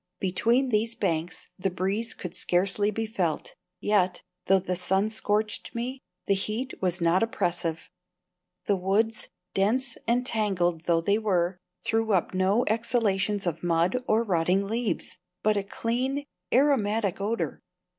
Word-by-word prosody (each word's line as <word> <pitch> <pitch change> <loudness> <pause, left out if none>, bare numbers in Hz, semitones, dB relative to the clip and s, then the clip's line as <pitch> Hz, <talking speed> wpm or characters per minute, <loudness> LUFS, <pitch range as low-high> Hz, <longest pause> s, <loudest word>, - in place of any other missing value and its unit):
Between 230 +8 +2
these 225 +1 +1
banks 170 -6 -2
the 195 +1 +1
breeze 195 +6 -1
could 180 - -7
scarcely 195 +3 +1
be 225 +2 -2
felt, 185 -8 -2 0.3
yet, 185 -4 +1 0.2
though 195 - +6
the 185 -1 -2
sun 190 +3 +1
scorched 215 0 -1
me, 250 +3 -3 0.3
the 200 - +3
heat 215 +7 -2
was 180 -1 0
not 170 +2 +3
oppressive. 175 -7 -1 0.8
The 205 - +3
woods, 210 +4 0 0.3
dense 230 +6 +1
and 245 +2 +2
tangled 180 -8 0
though 165 -1 +3
they 200 +5 +2
were, 180 -4 0 0.3
threw 225 -1 +1
up 185 -1 +1
no 190 +5 +2
exhalations 210 -3 +1
of 170 -1 -2
mud 175 +8 +1
or 220 +2 +3
rotting 185 -1 +2
leaves, 225 -1 -2 0.2
but 215 0 +3
a 200 - +1
clean, 250 +7 -1 0.3
aromatic 220 -8 +2
odour. 220 +3 -2
200 Hz, 140 wpm, -27 LUFS, 180-225 Hz, 0.8 s, though